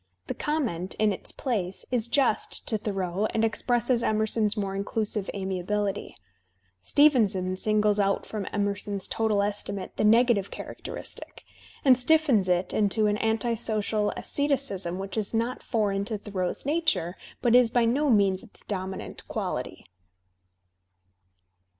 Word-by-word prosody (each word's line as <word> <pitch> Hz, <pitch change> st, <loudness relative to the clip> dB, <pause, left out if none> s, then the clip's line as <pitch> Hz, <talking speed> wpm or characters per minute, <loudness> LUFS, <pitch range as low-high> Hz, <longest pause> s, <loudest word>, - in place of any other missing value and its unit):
The -, -, -3 dB
comment, 235 Hz, -, -2 dB
in 215 Hz, -1 st, +2 dB
its -, -, -3 dB
place» 195 Hz, -8 st, -3 dB
is 240 Hz, -2 st, +1 dB
just 255 Hz, -3 st, +1 dB
to 220 Hz, -, 0 dB
Thoreau 195 Hz, -1 st, -1 dB
and 225 Hz, 0 st, +3 dB
expresses 240 Hz, +2 st, +1 dB
Emerson's 220 Hz, 0 st, +1 dB
more 195 Hz, -2 st, -2 dB
inclusive 205 Hz, 0 st, -2 dB
amiability. 195 Hz, +1 st, -2 dB, 0.7 s
Stevenson 205 Hz, -, +3 dB
singles 210 Hz, +1 st, +2 dB
out 195 Hz, -1 st, +1 dB
from 210 Hz, -3 st, -5 dB
Emerson's 200 Hz, -1 st, -2 dB
total 215 Hz, -3 st, +1 dB
estimate 200 Hz, -1 st, -3 dB
the -, -, +1 dB
negative 225 Hz, -2 st, +4 dB
characteristic, -, -, -8 dB, 0.4 s
and 260 Hz, -2 st, +8 dB
stiffens 255 Hz, -8 st, +3 dB
it 180 Hz, +1 st, +1 dB
into 215 Hz, +1 st, +2 dB
an 210 Hz, 0 st, +2 dB
anti 225 Hz, +2 st, 0 dB
social 215 Hz, -2 st, 0 dB
asceticism 270 Hz, -12 st, -1 dB
which 195 Hz, +2 st, -4 dB
is 215 Hz, +1 st, -2 dB
not 235 Hz, +3 st, -1 dB
foreign 205 Hz, -4 st, 0 dB
to 220 Hz, 0 st, -3 dB
Thoreau's 195 Hz, -1 st, -3 dB
nature 295 Hz, -, +1 dB, 0.3 s
but 240 Hz, -2 st, +3 dB
is 245 Hz, -1 st, +6 dB
by 240 Hz, 0 st, +2 dB
no 280 Hz, +6 st, +2 dB
means 200 Hz, -5 st, +3 dB
its 240 Hz, -, -15 dB
dominant 190 Hz, -1 st, -5 dB
quality. -, -, -4 dB
210 Hz, 130 wpm, -27 LUFS, 195-235 Hz, 0.7 s, and